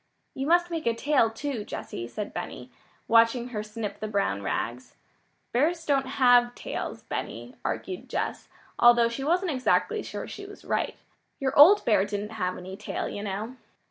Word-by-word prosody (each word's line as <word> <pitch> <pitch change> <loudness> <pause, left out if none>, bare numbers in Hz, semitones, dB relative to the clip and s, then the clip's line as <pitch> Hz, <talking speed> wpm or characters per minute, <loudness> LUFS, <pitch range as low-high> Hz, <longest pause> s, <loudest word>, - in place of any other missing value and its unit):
"You 270 +1 -3
must 345 +1 +3
make 325 -6 -3
a 230 - +2
tail, 265 -2 +3
too, 240 0 -4
Jessy," 115 -11 -6
said 205 - -6
Benny, - - -6 0.4
watching 230 +2 +4
her 215 -4 -3
snip 210 -1 -6
the 215 - -3
brown 200 - 0
rags. 120 +5 -3 0.6
"Bears 325 +7 +1
don't 275 -2 +2
have 245 -2 +4
tails, - - -5
Benny," - - -5
argued 370 - -4
Jess - - -3 0.3
although 240 -1 +6
she 235 +4 -5
wasn't 350 +4 +1
exactly 255 -3 +1
sure - - -6
she 400 0 -8
was 405 - -13
right. - - -1 0.4
"Your 270 0 -1
old 360 +9 +8
bear 215 -4 +4
didn't 205 +1 -4
have 185 -5 -2
any 185 +1 -8
tail, - - -4
you 205 - -5
know." 210 +5 -4
240 Hz, 170 wpm, -27 LUFS, 210-285 Hz, 0.6 s, old